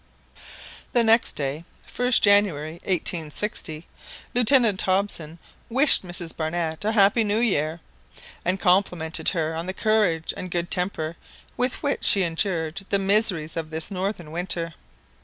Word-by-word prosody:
The 240 Hz, -2 st, +4 dB
next 225 Hz, +1 st, +3 dB
day, 145 Hz, +2 st, -4 dB, 0.2 s
1st 245 Hz, 0 st, +2 dB
January 195 Hz, -7 st, +2 dB
1860, 165 Hz, -2 st, -2 dB, 0.5 s
Lieutenant 240 Hz, -4 st, +5 dB
Hobson 185 Hz, -4 st, -1 dB, 0.3 s
wished 270 Hz, +5 st, +5 dB
Mrs 175 Hz, -2 st, -3 dB
Barnett 160 Hz, +1 st, -3 dB
a 215 Hz, +2 st, 0 dB
happy 205 Hz, +2 st, +4 dB
new 210 Hz, 0 st, 0 dB
year, 165 Hz, -8 st, 0 dB, 0.6 s
and 185 Hz, +2 st, 0 dB
complimented 180 Hz, -4 st, +1 dB
her 160 Hz, -3 st, -2 dB
on 165 Hz, +2 st, -5 dB
the 185 Hz, -, -4 dB
courage 205 Hz, -7 st, 0 dB
and 185 Hz, -, -7 dB
good 175 Hz, 0 st, -3 dB
temper 170 Hz, -3 st, -1 dB, 0.4 s
with 250 Hz, +4 st, -1 dB
which 285 Hz, -1 st, -1 dB
she 195 Hz, -, +4 dB
endured 165 Hz, 0 st, -2 dB
the 200 Hz, -, +3 dB
miseries 195 Hz, -5 st, +2 dB
of 160 Hz, -1 st, -4 dB
this 160 Hz, +4 st, -3 dB
northern 185 Hz, -4 st, -4 dB
winter. 170 Hz, -1 st, -4 dB
180 Hz, 135 wpm, -23 LUFS, 160-205 Hz, 0.6 s, Lieutenant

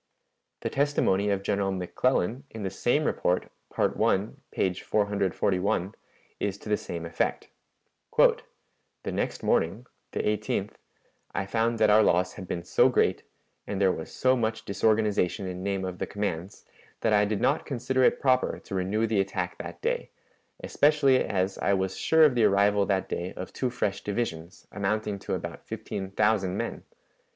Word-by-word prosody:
The -, -, -2 dB
testimony 135 Hz, -8 st, +2 dB
of 100 Hz, -1 st, 0 dB
General 100 Hz, -1 st, 0 dB
McClellan, 110 Hz, +5 st, 0 dB
in 110 Hz, -2 st, -7 dB
the 95 Hz, -, -2 dB
same 120 Hz, +9 st, +1 dB
report, 90 Hz, -10 st, 0 dB, 0.2 s
Part -, -, 0 dB
I, 100 Hz, +3 st, +2 dB, 0.2 s
p. 95 Hz, -, 0 dB
441, 100 Hz, -1 st, 0 dB, 0.5 s
is 100 Hz, -1 st, -2 dB
to 105 Hz, -, -10 dB
the 105 Hz, -, +4 dB
same 85 Hz, -4 st, -6 dB
effect: 85 Hz, -, -2 dB, 0.7 s
"The -, -, 0 dB
next -, -, -2 dB
morning 95 Hz, +9 st, +1 dB, 0.3 s
(the -, -, -2 dB
18th) 105 Hz, 0 st, -1 dB, 0.6 s
I 95 Hz, -, -1 dB
found 115 Hz, +3 st, 0 dB
that 110 Hz, -1 st, +4 dB
our 110 Hz, +1 st, +7 dB
loss 90 Hz, -2 st, +2 dB
had 95 Hz, -3 st, -9 dB
been 85 Hz, -, -3 dB
so -, -, +4 dB
great, -, -, +2 dB, 0.5 s
and 100 Hz, -, -3 dB
there 95 Hz, -2 st, +4 dB
was 80 Hz, -, -6 dB
so 130 Hz, 0 st, +2 dB
much 110 Hz, -2 st, -2 dB
disorganization 105 Hz, -2 st, +1 dB
in 90 Hz, -1 st, -5 dB
name 95 Hz, -1 st, -1 dB
of 90 Hz, -1 st, -5 dB
the -, -, -2 dB
commands, 100 Hz, -3 st, -4 dB, 0.4 s
that 110 Hz, -, +2 dB
I 105 Hz, 0 st, +5 dB
did 105 Hz, 0 st, -1 dB
not 140 Hz, -, +1 dB
consider 130 Hz, -1 st, -1 dB
it -, -, +4 dB
proper 130 Hz, -1 st, +2 dB
to -, -, -9 dB
renew 95 Hz, +4 st, 0 dB
the 110 Hz, -2 st, +1 dB
attack 95 Hz, -2 st, -3 dB
that -, -, -8 dB
day, -, -, -1 dB, 0.5 s
especially 145 Hz, -3 st, +3 dB
as 95 Hz, -1 st, -1 dB
I 100 Hz, -, +2 dB
was 95 Hz, 0 st, -1 dB
sure 160 Hz, 0 st, +4 dB
of 150 Hz, -4 st, +6 dB
the 120 Hz, -3 st, +3 dB
arrival 100 Hz, 0 st, +3 dB
that 95 Hz, -2 st, 0 dB
day 90 Hz, +1 st, -4 dB
of 90 Hz, -, -7 dB
two 130 Hz, -, -1 dB
fresh 105 Hz, -5 st, -2 dB
divisions, 95 Hz, -5 st, -4 dB
amounting 105 Hz, 0 st, -1 dB
to -, -, -3 dB
about -, -, -7 dB
fifteen 95 Hz, -1 st, -5 dB
thousand 100 Hz, -2 st, +1 dB
men. -, -, -4 dB
100 Hz, 165 wpm, -27 LUFS, 95-110 Hz, 0.7 s, our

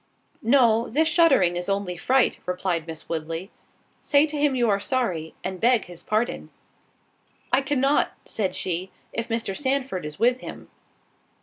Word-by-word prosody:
"No, 235 Hz, -2 st, +4 dB
this 315 Hz, +7 st, +2 dB
shuddering 320 Hz, -, +4 dB
is 175 Hz, +2 st, -3 dB
only 195 Hz, -2 st, -1 dB
fright," 260 Hz, +8 st, +2 dB
replied 180 Hz, -2 st, -1 dB
Miss 160 Hz, -1 st, -8 dB
Woodley—"Say 165 Hz, -, -2 dB
to 305 Hz, -1 st, -6 dB
him 290 Hz, -2 st, +2 dB
you 240 Hz, -2 st, +2 dB
are 200 Hz, -2 st, +2 dB
sorry, 195 Hz, -9 st, -1 dB
and 190 Hz, -1 st, -4 dB
beg 240 Hz, -2 st, +3 dB
his 175 Hz, -2 st, -11 dB
pardon." 220 Hz, +3 st, -1 dB, 1.0 s
"I 270 Hz, -, +5 dB
cannot," 275 Hz, 0 st, +2 dB
said 195 Hz, -4 st, -2 dB
she, 185 Hz, +1 st, -3 dB, 0.2 s
"if 230 Hz, +1 st, -3 dB
Mr. 225 Hz, -4 st, -2 dB
Sandford 265 Hz, -7 st, -1 dB
is 150 Hz, 0 st, -7 dB
with 245 Hz, +3 st, +3 dB
him." -, -, -9 dB
225 Hz, 145 wpm, -25 LUFS, 180-265 Hz, 1.0 s, I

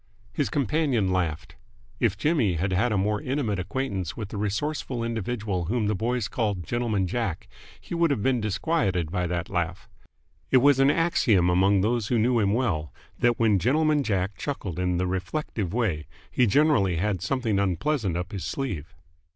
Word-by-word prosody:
His -, -, 0 dB
companion 140 Hz, -8 st, +1 dB
laughed. 85 Hz, -1 st, -2 dB, 0.4 s
If 110 Hz, -5 st, +1 dB
Jimmy 135 Hz, -, +2 dB
had 95 Hz, +4 st, -1 dB
had 110 Hz, +6 st, +2 dB
a 105 Hz, -, +1 dB
more 105 Hz, +3 st, 0 dB
intimate 130 Hz, -8 st, -1 dB
acquaintance 95 Hz, -4 st, -3 dB
with 105 Hz, -3 st, -5 dB
the 105 Hz, -, -6 dB
resourceful 115 Hz, +4 st, -2 dB
individual 110 Hz, -5 st, -2 dB
whom 110 Hz, +5 st, 0 dB
the 105 Hz, -, +1 dB
"boys" 115 Hz, +2 st, -1 dB
called 105 Hz, -7 st, -2 dB
Gentleman 115 Hz, -5 st, 0 dB
Jack, 95 Hz, -2 st, -3 dB, 0.3 s
he -, -, -9 dB
would 170 Hz, -1 st, +2 dB
have 135 Hz, -8 st, 0 dB
been 130 Hz, -3 st, +2 dB
disquieted 100 Hz, -, 0 dB
by 90 Hz, -1 st, -1 dB
that 85 Hz, +1 st, -2 dB
laugh. 90 Hz, -1 st, -2 dB, 0.6 s
It 130 Hz, -, +5 dB
was 135 Hz, +1 st, +5 dB
an 135 Hz, +1 st, +5 dB
axiom 115 Hz, -, +3 dB
among 95 Hz, +2 st, +3 dB
those 110 Hz, +1 st, 0 dB
who 120 Hz, -, +1 dB
knew 120 Hz, +2 st, +3 dB
him 100 Hz, -2 st, +2 dB
well, 95 Hz, -, 0 dB, 0.3 s
that 120 Hz, -1 st, +3 dB
when 110 Hz, -4 st, +3 dB
Gentleman 150 Hz, -, +2 dB
Jack 95 Hz, -5 st, -1 dB
chuckled 100 Hz, -, -4 dB
in 90 Hz, -1 st, 0 dB
the 90 Hz, -, 0 dB
reflective 95 Hz, -, -3 dB
way, 100 Hz, -10 st, -1 dB, 0.2 s
he 125 Hz, -, +3 dB
generally 115 Hz, -, +3 dB
had 95 Hz, +1 st, -1 dB
something 110 Hz, 0 st, 0 dB
unpleasant 100 Hz, -, 0 dB
up 90 Hz, +3 st, -4 dB
his 100 Hz, -4 st, -5 dB
sleeve. 95 Hz, -, -4 dB
105 Hz, 175 wpm, -26 LUFS, 90-125 Hz, 0.6 s, It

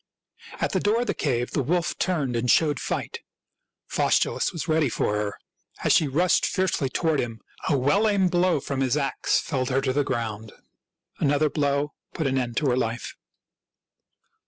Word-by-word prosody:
At -, -, 0 dB
the -, -, +1 dB
door 220 Hz, +3 st, +2 dB
of -, -, -1 dB
the -, -, -1 dB
cave 125 Hz, -4 st, -1 dB
the 145 Hz, -, 0 dB
wolf 170 Hz, +5 st, 0 dB
turned 150 Hz, -10 st, 0 dB
and 120 Hz, +1 st, -1 dB
showed 150 Hz, -3 st, +3 dB
fight. -, -, -3 dB, 0.7 s
Faustulus -, -, +1 dB
was 165 Hz, -, -5 dB
ready 155 Hz, -3 st, +2 dB
for 105 Hz, -, -1 dB
her. 105 Hz, -1 st, -3 dB, 0.4 s
As -, -, +4 dB
she 155 Hz, -, +4 dB
rushed 170 Hz, +6 st, +2 dB
fiercely 185 Hz, -8 st, 0 dB
toward 160 Hz, +2 st, 0 dB
him, 115 Hz, -2 st, -3 dB, 0.3 s
a 145 Hz, -, +3 dB
well 170 Hz, +12 st, +3 dB
aimed 195 Hz, -4 st, +2 dB
blow 175 Hz, -2 st, +2 dB
from 140 Hz, 0 st, -4 dB
his 130 Hz, +1 st, +1 dB
ax 140 Hz, -2 st, +1 dB
felled 130 Hz, -5 st, -2 dB
her 130 Hz, 0 st, +2 dB
to 130 Hz, -, 0 dB
the 145 Hz, +1 st, +2 dB
ground; 110 Hz, -4 st, -4 dB, 0.7 s
an 140 Hz, -, +2 dB
other 145 Hz, 0 st, +2 dB
blow 145 Hz, 0 st, 0 dB, 0.2 s
put 160 Hz, -, -2 dB
an 135 Hz, -1 st, +1 dB
end 120 Hz, -2 st, -3 dB
to 150 Hz, -, +1 dB
her 125 Hz, -, +1 dB
life. 115 Hz, -1 st, -2 dB
140 Hz, 180 wpm, -25 LUFS, 125-160 Hz, 0.7 s, As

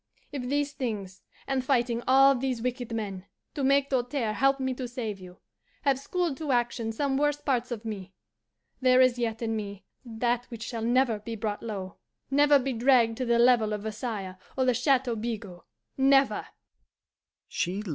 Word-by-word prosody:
If 285 Hz, -3 st, -4 dB
these 285 Hz, +3 st, -1 dB
things, 200 Hz, -8 st, -4 dB, 0.2 s
and 270 Hz, -1 st, -1 dB
fighting 240 Hz, -3 st, +1 dB
all 270 Hz, +1 st, +7 dB
these 255 Hz, -3 st, -2 dB
wicked 250 Hz, -1 st, -3 dB
men, 200 Hz, -4 st, -4 dB, 0.3 s
to 285 Hz, -, -3 dB
make 275 Hz, +1 st, +3 dB
Doltaire 245 Hz, -3 st, 0 dB
help 270 Hz, +3 st, +2 dB
me 260 Hz, -1 st, -1 dB
to 255 Hz, 0 st, -5 dB
save 225 Hz, -5 st, -5 dB
you, 180 Hz, -1 st, -12 dB, 0.5 s
have 275 Hz, -3 st, +2 dB
schooled 330 Hz, 0 st, -2 dB
to 305 Hz, -3 st, -3 dB
action 240 Hz, -2 st, 0 dB
some 270 Hz, +4 st, -1 dB
worse 295 Hz, 0 st, +2 dB
parts 255 Hz, -4 st, -1 dB
of 235 Hz, -2 st, -5 dB
me, 200 Hz, -4 st, -6 dB, 0.7 s
there 255 Hz, 0 st, +5 dB
is 255 Hz, -1 st, +4 dB
yet 225 Hz, -1 st, -2 dB
in 225 Hz, -1 st, -1 dB
me 205 Hz, -2 st, -6 dB, 0.2 s
that 240 Hz, 0 st, -1 dB
which 230 Hz, -2 st, -7 dB
shall 230 Hz, -1 st, -5 dB
never 240 Hz, -1 st, +2 dB
be 225 Hz, +2 st, -6 dB
brought 210 Hz, -1 st, -3 dB
low, 195 Hz, -5 st, -6 dB, 0.3 s
never 290 Hz, +1 st, +6 dB
be 270 Hz, 0 st, -2 dB
dragged 235 Hz, -1 st, +4 dB
to 255 Hz, -, -2 dB
the 235 Hz, -1 st, +3 dB
level 235 Hz, -3 st, +4 dB
of 210 Hz, -1 st, -4 dB
Versailles 215 Hz, -4 st, -4 dB, 0.2 s
or 260 Hz, -, +2 dB
the 250 Hz, -, +3 dB
Chateau 250 Hz, -1 st, +2 dB
Bigot 210 Hz, -5 st, -5 dB, 0.4 s
never!" 270 Hz, 0 st, +3 dB
245 Hz, 170 wpm, -28 LUFS, 220-270 Hz, 0.7 s, all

